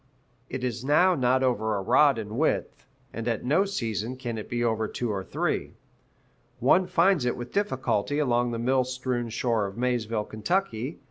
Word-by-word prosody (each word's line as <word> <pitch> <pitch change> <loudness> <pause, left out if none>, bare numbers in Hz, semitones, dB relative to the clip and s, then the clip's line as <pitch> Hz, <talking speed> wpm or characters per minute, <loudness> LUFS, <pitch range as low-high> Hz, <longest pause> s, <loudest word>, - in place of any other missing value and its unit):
It 130 -1 -5
is 125 -1 -2
now 175 +7 +4
not 130 -3 +2
over 110 -4 +1
a - - -2
rod 140 +5 +4
in 110 -1 -5
width, 160 - -1 0.3
and 115 +1 -5
at 115 -1 -1
no 150 +10 +3
season 115 - -3
can 120 -3 -4
it 105 - -8
be 120 0 -1
over 110 -2 0
two 120 0 -3
or 95 -2 -3
three. - - -2 0.8
One 185 0 +3
finds 185 -3 +3
it 125 - 0
with 120 0 -7
difficulty 145 - 0
along 120 -4 +2
the 115 - -3
mill 130 +3 +2
strewn 125 -2 -3
shore 115 -2 0
of 100 - -10
Maysville, 115 -3 -1
Ky. 130 - -2
125 Hz, 180 wpm, -27 LUFS, 110-135 Hz, 0.8 s, now